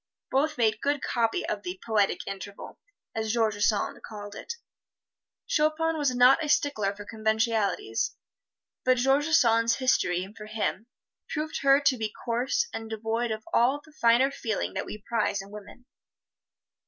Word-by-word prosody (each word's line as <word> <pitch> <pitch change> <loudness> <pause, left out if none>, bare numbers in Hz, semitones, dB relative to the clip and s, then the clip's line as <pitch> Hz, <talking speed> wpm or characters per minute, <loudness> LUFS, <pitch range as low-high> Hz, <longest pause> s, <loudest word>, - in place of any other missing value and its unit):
Both 295 +3 +1
made 220 -2 +2
good 285 0 0
copy 235 +9 0
of - - -2
the 365 +1 -6
"poetic 210 -3 +1
interval," 195 +1 -8 0.3
as 220 -1 -2
George 215 -3 +1
Sand 210 -1 0
called 205 -1 -8
it. 465 - -6 0.9
Chopin 320 +1 +1
was 285 -5 0
not 250 +5 +6
a 300 - -3
stickler 275 -10 +1
for 205 0 -9
conventionalities, 220 - 0 0.7
but 255 0 +3
George 270 +4 +3
Sand's 230 -7 +4
history, 185 -8 +1
for 210 -1 -9
him, 220 +1 -2 0.4
proved 310 0 -3
her 275 0 +6
to 275 -2 +3
be 220 -2 -3
coarse 255 - 0
and 225 0 -5
devoid 225 +2 -2
of 220 0 -4
all 260 +5 +3
the 310 - -18
finer 250 -1 +3
feeling 225 -6 -3
that - - -3
we 210 -1 -8
prize 215 -3 0
in 195 +1 -9
women. 210 +4 -11
230 Hz, 155 wpm, -27 LUFS, 215-280 Hz, 0.9 s, not